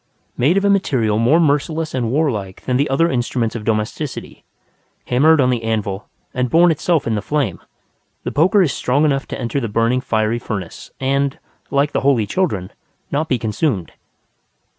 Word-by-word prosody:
Made 145 +10 +2
of 195 - +1
a - - +4
material 120 - +1
more 130 +9 +4
merciless 155 +1 0
and 120 -3 -1
warlike 115 -11 -1
than 125 - 0
the 140 +3 +1
other 140 +5 +3
instruments 120 -4 -1
of 115 - -5
domesticity, 110 +6 -3 0.6
hammered 155 +6 +4
on 130 -2 +3
the 120 -2 -1
anvil 105 -3 -3 0.2
and 125 -2 -1
born 170 +5 +5
itself 160 0 0
in 115 - 0
the 105 - -1
flame, 135 - -1 0.6
the - - -3
poker 185 +7 +4
is 150 - 0
strong 140 +5 +1
enough 140 -2 0
to - - -6
enter 120 +2 -2
the 115 -4 -3
burning 115 +4 +1
fiery 110 -1 0
furnace, 100 -7 -6
and, 140 +1 0 0.3
like 140 +1 +1
the - - -1
holy 130 -5 +3
children, 105 - -1 0.4
not 155 +3 -1
be 130 - +2
consumed. 110 - -1
130 Hz, 175 wpm, -19 LUFS, 110-150 Hz, 0.6 s, born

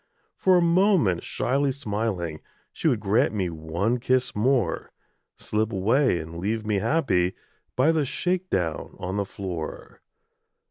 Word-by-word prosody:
For 185 -1 +4
a 175 - +3
moment 170 - +3
shyly 135 +3 0
smiling, 105 - -3 0.3
She - - -1
would - - +2
grant - - +2
me 95 -4 -1
one 85 +9 -1
kiss 130 +1 +1
more 115 -4 +1 0.4
Slip 110 +1 -1
away 115 +4 +2
and 80 +1 -6
leave 110 +4 -2
me 105 -2 +1
happy 95 - +1 0.4
By 135 +6 +4
the 160 -2 +1
shake 180 +6 -1
down 85 -4 -2
on 95 +2 -4
the 100 - 0
floor. 90 -5 -6
110 Hz, 140 wpm, -25 LUFS, 90-140 Hz, 0.4 s, For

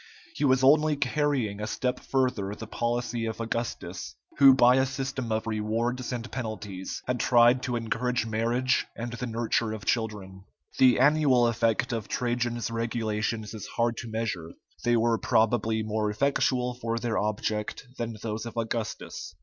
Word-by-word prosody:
He - - -3
was 130 -1 +3
only 150 +2 +5
carrying 135 -6 0
a 105 - -2
step 125 +3 -1
further 125 -7 -1
the 110 - -8
policy 120 0 -2
of 110 - -5
Augustus, 115 - -4 0.2
who 135 -2 +9
by 125 0 +6
a 130 - +4
system 130 -2 -4
of 110 0 0
rewards 115 +3 -1
and 120 -1 -5
penalties 110 -6 -5
had 125 -1 -1
tried 120 +1 +5
to 125 -2 -2
encourage 120 +1 -1
marriage 115 +3 +1
and 120 0 -5
the 120 +2 -4
nurture 115 -1 0
of 110 - -7
children. 100 -4 -2 0.4
The 130 -2 +6
annual 140 -3 +4
effect 115 0 +1
of 110 -3 -3
Trajan's 120 -2 -1
regulations 110 -1 -2
is 110 -3 -7
hard 115 0 0
to 120 - -6
measure; 110 -7 -3 0.3
they 120 0 +3
were 115 0 +2
probably 110 0 +2
more 110 0 -1
effectual 125 +1 +1
for 115 -1 -3
their 115 -1 -1
object 105 +3 -2
than 115 -2 -3
those 110 +1 -3
of 115 - -9
Augustus. 115 -1 -4
115 Hz, 155 wpm, -27 LUFS, 110-125 Hz, 0.4 s, who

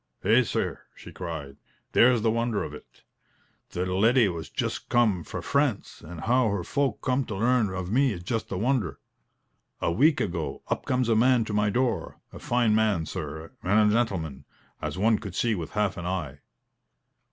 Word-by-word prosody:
"Heh, 110 +6 +5
sir!" 120 - -2 0.2
she - - -12
cried, 80 -6 -6 0.3
"there's 120 -2 +5
the 110 - +3
wonder 115 -2 0
of 75 - -6
it. 75 - -14 0.7
The 90 +1 -2
leddy 110 +7 +3
has 85 -4 -3
just - - -3
come 110 -8 +2
fra - - -6
France; 140 -6 0
and 80 +1 -8
how 125 +2 +2
her 100 -3 -2
folk 135 +3 -1
come 130 +1 +1
to 105 - -5
learn 115 +1 +2
of 95 0 -4
me 130 +1 +3
is 85 -2 -8
just 115 +3 -3
a 95 - -2
wonder. 115 -4 0 0.8
A - - 0
week 145 - +4
ago, 85 -7 -3
up - - -2
comes 125 -2 +1
a 115 - +3
man 120 0 +4
to 110 - -5
my 105 0 +2
door 120 0 -1
a - - -9
fine 120 -3 +1
man, 105 -6 +2
sir, 80 +2 -6
and 105 +3 +3
a - - +1
gentleman, 80 - -1 0.4
as - - -4
one 110 +2 +3
could 95 -3 -8
see 115 -2 +1
with 85 -6 -5
half 105 -2 0
an 85 0 -4
eye. 80 -7 -3
105 Hz, 185 wpm, -26 LUFS, 90-120 Hz, 0.8 s, Heh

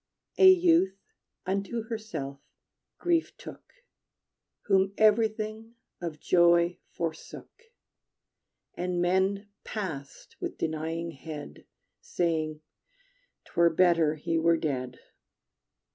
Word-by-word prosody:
A 380 - +9
youth 335 - +4 0.5
unto 200 +4 -2
herself 175 - -6 0.6
Grief 340 -2 0
took, - - -12 0.9
Whom 195 0 +2
everything 215 +1 +1 0.3
of 165 -3 -5
joy 175 +1 +3
forsook, 165 - -7 1.1
And 180 0 -2
men 190 +3 +1
passed 160 -10 -6
with - - -4
denying 165 +1 -3
head, 145 - -9 0.3
Saying: 155 -3 -1 0.8
"'T - - -20
were 170 0 +5
better 165 -2 +3
he 165 +2 -1
were 165 +1 +3
dead." 130 -6 -3
175 Hz, 90 wpm, -28 LUFS, 160-215 Hz, 1.1 s, A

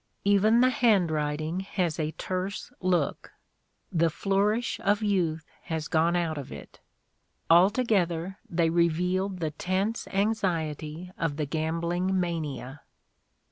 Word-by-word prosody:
Even 210 +4 +4
the 255 0 +5
handwrit 160 -11 +2
ing 160 +4 -2
has 185 -4 -2
a 155 -1 0
terse 185 +1 -4
look; 180 -5 -1 0.6
the 165 0 +3
flourish 205 +7 0
of 205 +2 +2
youth 170 -7 0 0.2
has 160 -2 -3
gone 165 +2 +2
out 165 -3 -1
of 140 - -8
it. 70 - -11 0.7
Altogether 185 -2 +3
they 165 -1 +1
reveal 175 +3 +1
the 175 -5 -3
tense 190 +8 -2
anxiety 180 -5 -1
of 160 -3 -1
the 150 - -1
gambling 170 +5 -1
mania." 150 -6 -3
175 Hz, 120 wpm, -27 LUFS, 160-195 Hz, 0.7 s, the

